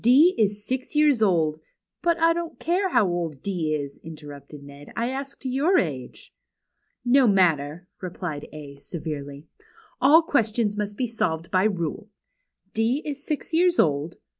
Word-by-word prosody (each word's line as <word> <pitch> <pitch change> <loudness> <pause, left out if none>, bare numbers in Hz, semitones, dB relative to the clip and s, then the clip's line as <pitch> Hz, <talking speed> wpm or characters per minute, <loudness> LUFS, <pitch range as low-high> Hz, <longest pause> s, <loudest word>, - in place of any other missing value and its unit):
D 285 +10 +6
is 205 -1 0
six 260 +4 -4
years 295 -6 +4
old 160 -7 +2
" - - -50
— - - -64
" - - -63
But 340 -1 +2
I 330 0 +4
don't 340 -1 -5
care 370 +3 0
how 215 - +3
old 170 -6 -3
D 170 -6 -1
is," 140 -2 -6
interrupted 150 -2 -11
Ned. 140 0 -12
" - - -29
I 235 +1 -1
asked 275 +1 -6
your 275 +9 +2
age." 135 -8 -3 0.4
" - - -49
No 260 - +5
matter," 175 -4 +2
replied 175 -5 -5
A, 145 -2 -10
severely. 145 -2 -6 0.3
" - - -28
All 310 +5 +7
questions 225 -7 +1
must 205 0 -4
be 255 - 0
solved 170 -8 -2
jjy 190 +1 +2
rule. 170 +5 -4 0.6
D 230 +7 +1
is 285 -1 -5
six 305 +1 -4
years 350 +2 +3
old. 150 +1 +1
200 Hz, 175 wpm, -25 LUFS, -, 0.6 s, All